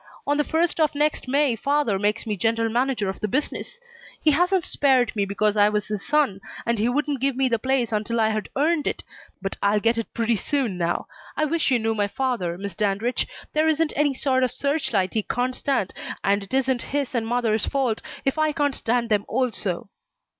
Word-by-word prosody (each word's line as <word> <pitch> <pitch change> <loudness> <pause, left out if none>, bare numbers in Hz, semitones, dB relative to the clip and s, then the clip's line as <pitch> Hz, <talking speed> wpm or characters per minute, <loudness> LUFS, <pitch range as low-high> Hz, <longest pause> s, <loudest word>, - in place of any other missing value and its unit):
On 290 - +2
the 295 - +3
first 330 +2 0
of 310 -2 +2
next 295 -2 0
May 275 -1 +2
father 275 -4 +1
makes 210 +2 0
me 215 -2 -1
general 225 +2 0
manager 245 -3 0
of 190 - -4
the 215 - -1
business. 295 - -3 0.4
He 310 - +3
hasn't 355 +4 +2
spared 260 -5 +2
me 200 -2 +1
because 205 +1 +1
I 205 0 +5
was 210 0 -1
his 210 -2 -3
son, 285 -11 +1 0.2
and 235 -2 0
he 225 +3 +2
wouldn't 290 +1 0
give 275 -1 +1
me 265 0 +2
the 230 -2 +1
place 260 -1 0
until 220 +2 -1
I'd 220 -1 0
earned 300 +2 +1
it, - - -2 0.4
but 195 - -2
I'll 205 +1 +3
get 230 +2 +2
it 230 - -5
pretty 230 -1 +1
soon 260 -5 -1
now. 175 -1 -1 0.3
I 310 - +2
wish 320 0 0
you 255 - +4
knew 225 -1 0
my 205 -2 0
father, 205 -8 -2
Miss 200 0 -5
Dandridge. 210 +6 0 0.3
There 310 +1 +3
isn't 315 0 +2
any 290 -1 +2
sort 260 -1 +1
of 255 - +3
search 280 +1 -1
light 190 -4 +1
he 220 - +1
can't 250 +4 -1
stand, 265 -9 -1 0.3
and 200 +1 +2
it 195 - -12
isn't 260 -2 +1
his 280 -1 -2
and 230 -3 -1
mother's 225 -3 +1
fault 260 -6 0 0.2
if 270 +3 0
I 310 -1 +2
can't 290 -3 +1
stand 235 -1 0
them, 205 -2 +2
also." 225 -8 -1
245 Hz, 210 wpm, -24 LUFS, 215-285 Hz, 0.4 s, I